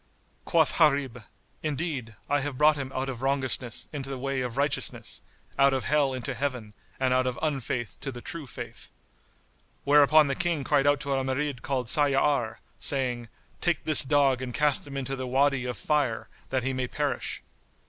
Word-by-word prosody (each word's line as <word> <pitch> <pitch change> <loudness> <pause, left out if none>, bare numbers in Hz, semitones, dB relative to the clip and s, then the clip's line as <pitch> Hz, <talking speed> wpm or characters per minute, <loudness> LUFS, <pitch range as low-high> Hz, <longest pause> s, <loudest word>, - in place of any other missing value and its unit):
Quoth 160 -3 +3
Gharib, 140 -7 +2 0.4
"Indeed, 145 -7 -3
I 145 0 +2
have 140 -2 -3
brought 150 +2 +5
him 135 -2 -5
out 130 +1 -1
of 130 -3 -5
wrongousness 130 -3 -1
into 135 -2 -5
the 135 - -4
way 135 0 -2
of 125 0 -4
righteousness, 140 0 -1 0.4
out 140 0 +5
of 130 - -2
Hell 145 -1 +2
into 125 -3 -4
Heaven 125 -7 -3 0.3
and 130 -1 +2
out 130 0 +2
of 125 - -2
unfaith 130 -6 -3
to 135 - -4
the 120 - -8
True 160 +3 -6
Faith." - - -8 0.9
Whereupon 150 +2 +6
the 140 - 0
King 170 -2 -1
cried 145 0 +2
out 145 -1 +4
to 140 - -2
a 135 -1 0
Marid 130 0 -2
called 130 -2 -2
Sayyár, 140 -2 +2 0.2
saying 125 -4 0 0.3
"Take 175 -3 0
this 155 -1 +7
dog 135 -2 +3
and 125 -2 -5
cast 150 -1 +3
him 140 -1 -6
into 135 0 -3
the 130 -1 -5
Wady 135 0 +2
of 125 -1 -4
Fire, 130 -7 0 0.2
that 130 -2 0
he 135 +1 -1
may 130 -1 -2
perish." 145 +3 -2
135 Hz, 180 wpm, -27 LUFS, 130-145 Hz, 0.9 s, this